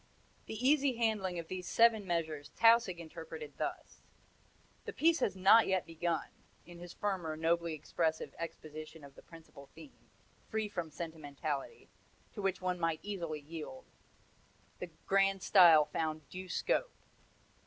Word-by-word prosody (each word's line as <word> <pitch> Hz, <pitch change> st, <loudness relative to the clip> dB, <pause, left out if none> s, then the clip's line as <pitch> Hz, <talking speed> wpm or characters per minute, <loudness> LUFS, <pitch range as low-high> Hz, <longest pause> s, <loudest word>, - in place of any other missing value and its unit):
The -, -, -5 dB
easy 280 Hz, -3 st, +3 dB
handling 215 Hz, -6 st, 0 dB
of 165 Hz, -1 st, -5 dB
these 185 Hz, 0 st, -6 dB
seven 225 Hz, -3 st, +4 dB
measures 160 Hz, -4 st, -2 dB
Tausig 230 Hz, -5 st, +5 dB
interpreted 170 Hz, -, -9 dB
thus: -, -, -5 dB, 0.8 s
'The -, -, -5 dB
piece 330 Hz, +1 st, +3 dB
has 195 Hz, -, 0 dB
not 195 Hz, +4 st, +6 dB
yet 190 Hz, -2 st, +1 dB
begun;' 165 Hz, +1 st, -3 dB, 0.3 s
in 175 Hz, 0 st, -12 dB
his 175 Hz, 0 st, -9 dB
firmer, 180 Hz, -7 st, -3 dB
nobly 165 Hz, 0 st, 0 dB
expressive 160 Hz, +1 st, -2 dB
exposition 155 Hz, -1 st, -8 dB
of 140 Hz, -1 st, -12 dB
the -, -, -15 dB
principal 155 Hz, -4 st, -15 dB
theme, 290 Hz, -, -15 dB, 0.4 s
free 220 Hz, -1 st, -1 dB
from 175 Hz, -5 st, -4 dB
sentimentality 155 Hz, -, -5 dB, 0.5 s
to 210 Hz, -, -6 dB
which 195 Hz, -1 st, -1 dB
one 180 Hz, -1 st, -1 dB
might 165 Hz, -2 st, 0 dB
easily 170 Hz, -7 st, -4 dB
yield 165 Hz, -, -8 dB, 0.9 s
the -, -, -6 dB, 0.2 s
grand 195 Hz, -1 st, +2 dB
style 170 Hz, -6 st, +7 dB
found 155 Hz, -1 st, -3 dB
due 185 Hz, 0 st, -8 dB
scope. -, -, -1 dB
175 Hz, 140 wpm, -33 LUFS, 160-200 Hz, 0.9 s, style